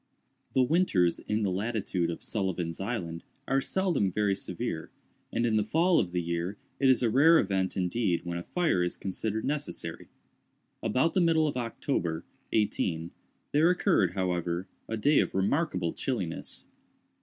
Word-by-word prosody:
The 130 - +5
winters 125 - +2
in 105 +1 -1
the 95 - +1
latitude 100 -3 -1
of 85 - -5
Sullivan's 90 -5 -2
Island 90 -6 -3 0.2
are 135 +1 +2
seldom 170 - +1
very 105 +1 +1
severe, - - -4 0.4
and 115 - 0
in 110 -2 +2
the 105 - +3
fall 165 - +3
of 90 - -1
the 90 -1 -1
year 85 +4 -2 0.2
it 135 - +4
is 130 -1 +4
a 120 - +3
rare 160 +7 +6
event 95 -6 0
indeed 90 -1 0
when 85 0 -3
a - - -6
fire 170 - +1
is 90 0 -1
considered 110 +3 -3
necessary. 150 +1 -3 0.7
About 130 +9 +1
the 185 - +3
middle 160 -2 +4
of 145 - -2
October, 115 - -2 0.3
18—, 90 -6 0 0.4
there 155 +4 +4
occurred, 180 - +2
however, 90 -1 -1 0.2
a 110 - -2
day 145 +7 +4
of - - 0
remarkable 95 - +1
chilliness. - - -3
105 Hz, 155 wpm, -29 LUFS, 90-135 Hz, 0.7 s, rare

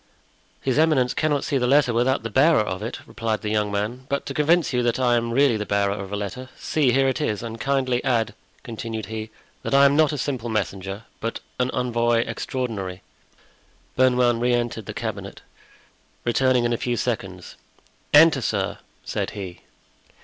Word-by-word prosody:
"His 130 +2 +1
eminence 145 -6 +3
cannot 150 -2 0
see 140 - 0
the 125 - +1
letter 140 -2 +4
without 120 +1 +1
the 115 - -4
bearer 145 +3 +5
of 95 -2 -4
it," 115 +3 -5
replied 110 -1 -3
the 105 - -2
young 105 -1 0
man; 110 +6 -3
"but 140 0 -1
to - - -4
convince 160 0 +2
you 125 - +2
that 120 +1 0
I 125 -2 +3
am 115 0 0
really 130 -2 +3
the 105 - -2
bearer 100 -1 +1
of 100 -1 -6
a - - -2
letter, 125 +6 -5
see, 145 -5 +1
here 135 +2 +3
it 135 +3 -1
is; 110 -7 -1
and 115 -1 -6
kindly 130 -3 0
add," 115 -4 +1 0.3
continued 115 -2 -5
he, 110 +1 -6 0.3
"that - - -1
I 140 0 +7
am 140 0 +4
not 155 0 +4
a 150 - -3
simple 125 -4 -3
messenger, 100 -1 -3 0.2
but 115 +1 -3 0.2
an 125 0 +1
envoy 120 -2 +1
extraordinary." 100 -8 -4 0.9
Bernouin 125 -2 +3
re 120 +1 +2
entered 120 -3 -3
the - - -6
cabinet, - - -5 0.8
returning 125 +1 +3
in 120 - +1
a - - 0
few 120 0 -2
seconds. - - -4 0.6
"Enter, 150 -2 +7
sir," 100 -3 -1 0.3
said - - -2
he. 95 -3 -7
120 Hz, 185 wpm, -23 LUFS, 110-135 Hz, 0.9 s, I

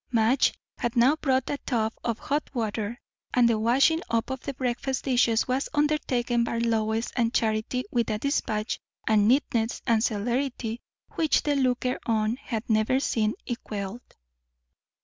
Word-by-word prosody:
Madge 230 +3 +3 0.2
had 240 -1 -2
now 255 +6 +5
brought 265 -5 0
a 285 - -2
tub 220 -3 -1
of 230 -2 -1
hot 290 +4 -2
water, 225 0 -2 0.4
and 245 -2 +5
the 225 -2 +2
washing 270 +9 +3
up 230 +2 0
of 265 - -3
the 280 - -4
breakfast 260 +1 -2
dishes 240 -4 +2
was 260 +2 -1
undertaken 260 -5 +1
by 235 0 -2
Lois 225 -1 0
and 235 -1 +1
Charity 220 +3 0
with 235 -2 +1
a 215 - 0
despatch 220 -4 -1 0.3
and 210 -2 +4
neatness 235 -3 +1
and 225 -1 +3
celerity 235 +1 -1 0.3
which 315 -4 +2
the 295 -1 +1
looker 255 -2 +1
on 220 +1 +1
had 230 -5 -5
never 220 +4 +2
seen 220 -5 0
equalled. 215 -2 -5
235 Hz, 150 wpm, -26 LUFS, 220-260 Hz, 0.4 s, now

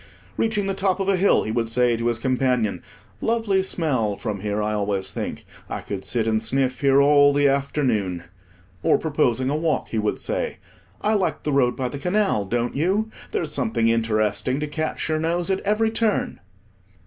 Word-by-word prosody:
Reaching 215 -3 0
the 195 - 0
top 195 0 0
of 195 - -1
a 195 - +3
hill, 195 +2 +3
he 110 - -3
would 115 0 -1
say 120 0 +2
to 115 +1 -2
his 120 -1 +1
companion—"Lovely 130 - -1
smell 135 - -1
from 105 -2 -4
here, 105 +1 -2
I 105 0 -1
always 100 -2 -1
think; - - -5 0.2
I - - -4
could 95 -1 -5
sit 115 -3 0
and 110 -1 +1
sniff 130 +2 0
here 140 -1 +4
all 145 0 +6
the 145 0 +3
afternoon." 125 - 0 0.6
Or, - - +3
proposing 135 -4 0
a - - 0
walk, 155 0 -1
he 110 - -1
would 105 0 0
say—"I 215 - -4
like 200 -4 0
the 150 - -1
road 125 -3 +3
by 130 - -1
the 135 +3 -6
canal, 180 - +1
don't 120 +4 -1
you? 195 +9 0 0.2
There's 155 -3 -2
something 150 - +1
interesting 110 +2 0
to - - 0
catch 155 +1 -3
your 155 0 0
nose 170 +3 0
at 190 - +1
every 215 +2 +1
turn.") 225 -2 0
135 Hz, 185 wpm, -23 LUFS, 115-180 Hz, 0.6 s, all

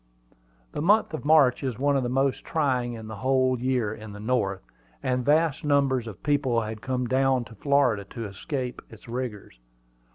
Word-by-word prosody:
The - - -4
month 205 +2 +3
of 155 - -5
March 145 -5 +5
is 130 -5 -3
one 140 +1 +2
of 135 - +2
the 120 - -2
most 135 +1 0
trying 130 -6 0
in 110 -1 -8
the 110 -1 -7
whole 130 +1 +2
year 125 -4 0
in 110 -2 -9
the 105 - -9
North, 105 - -1 0.4
and 125 -1 0
vast 150 +1 +2
numbers 140 -4 +2
of 105 -5 -10
people 135 -5 +1
had 110 0 -6
come 130 -1 -1
down 130 0 +2
to 115 - -13
Florida 125 -3 +2
to 115 +3 -7
escape 125 +5 -4
its 110 0 -15
rigors. 115 - -5
130 Hz, 185 wpm, -26 LUFS, 115-140 Hz, 0.4 s, March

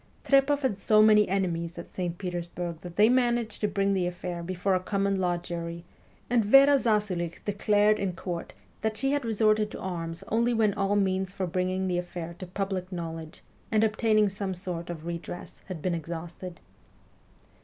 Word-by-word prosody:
Trepoff 275 +1 +3
had 210 -7 0
so 215 +1 +5
many 210 -1 +6
enemies 170 -3 -1
at 170 - -9
St. 175 -2 -3
Petersburg 175 -2 -4
that 175 -1 -9
they 210 +3 +6
managed 240 -2 +1
to 210 - +2
bring 200 -1 +1
the 185 -2 +1
affair 175 0 -5
before 185 +2 -1
a 185 - +3
common 195 +1 0
law 175 -1 +1
jury, 170 0 -6 0.4
and 240 -2 +3
Vera 275 +6 +7
Zasulich 205 -8 -1
declared 205 +1 +3
in 190 -2 -1
court 175 -1 -5 0.3
that 220 0 -1
she 270 +3 +1
had 285 -1 0
resorted 215 -1 +2
to - - -8
arms 165 -2 -4
only 235 +2 +2
when 215 -2 +3
all 195 +1 0
means 190 -1 0
for 190 - -1
bringing 185 +1 -1
the 180 -1 0
affair 175 -1 -6
to 185 - -6
public 190 0 -3
knowledge 165 -2 -6 0.3
and 215 0 +3
obtaining 215 -1 +3
some 195 -1 -3
sort 175 -2 -5
of 165 -2 -6
redress 170 +1 -6
had 180 -5 -6
been 185 - +1
exhausted. 170 +2 -6
190 Hz, 175 wpm, -28 LUFS, 175-215 Hz, 0.4 s, Vera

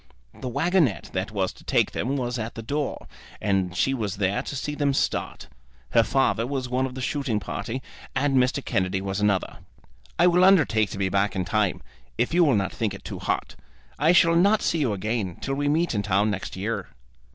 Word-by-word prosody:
The 130 - -6
waggonet 160 - +1
that 95 +3 -2
was 95 -3 -1
to - - -17
take - - +2
them 135 +6 -2
was 125 -1 -2
at 110 +1 -5
the 115 - -6
door, 145 +4 -3 0.3
and 95 -3 0
she 135 - +2
was 110 -6 -2
there 100 0 0
to - - -6
see 150 +3 -3
them 145 -2 0
start. - - -2 0.4
Her 115 - +6
father 120 -1 +1
was 135 -2 -2
one 130 +2 0
of 130 - -9
the 130 - -4
shooting 135 -6 -1
party, 125 +4 -5 0.3
and 135 0 +1
Mr. 130 +2 +1
Kennedy 95 +1 0
was 95 +1 -3
another. 100 -2 +1 0.6
"I 175 - +5
will 180 +1 +5
undertake 150 - +4
to - - -6
be 95 -1 0
back 100 +1 +1
in 95 -1 -1
time, 100 0 0 0.3
if 120 +6 0
you 175 0 +5
will 140 -7 +4
not 95 -2 0
think 110 -4 -2
it - - -12
too - - -6
hot. - - -2 0.4
I 155 +4 +5
shall 170 -1 +5
not 200 +5 +4
see 165 - +1
you 135 -7 +1
again 105 -2 -2
till 135 - -3
we 145 +1 0
meet 165 +2 +1
in 105 - 0
town 100 +1 +1
next 100 -1 -5
year." 105 +5 -3
120 Hz, 210 wpm, -25 LUFS, 100-140 Hz, 0.6 s, Her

